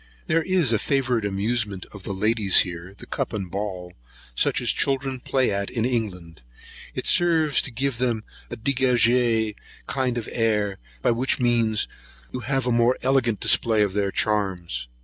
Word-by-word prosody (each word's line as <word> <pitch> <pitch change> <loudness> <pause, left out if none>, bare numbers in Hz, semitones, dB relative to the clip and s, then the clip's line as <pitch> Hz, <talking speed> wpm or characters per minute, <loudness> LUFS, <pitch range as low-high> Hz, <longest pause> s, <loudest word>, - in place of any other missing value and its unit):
There 165 - +2
is 175 -8 +2
a 110 - +2
favourite 125 -5 0
amusement 100 -1 -2
of 100 - -10
the - - -3
ladies 105 0 +3
here, 90 +2 -6
(the - - -10
cup - - -3
and 95 -5 -4
ball), 95 -3 -4 0.4
such - - +2
as - - +2
children 135 -1 0
play 130 0 +1
at 100 0 -2
in 115 -1 -1
England. 95 - -3 0.5
It - - -3
serves 165 -5 +3
to - - -5
give 130 0 -2
them 120 -4 0 0.3
a 120 - -6
dégagé 120 -3 +2 0.3
kind 130 -3 -1
of 115 - -4
air, 105 -4 0 0.2
by - - +4
which 125 +3 0
means 115 -3 +1 0.5
you 125 - -3
have 130 +1 -1
a 125 - +1
more 120 +2 +3
elegant 125 -5 +2
display 110 -2 +3
of 100 -2 -1
their 100 -1 0
charms. 90 - -1
115 Hz, 170 wpm, -24 LUFS, 100-125 Hz, 0.5 s, by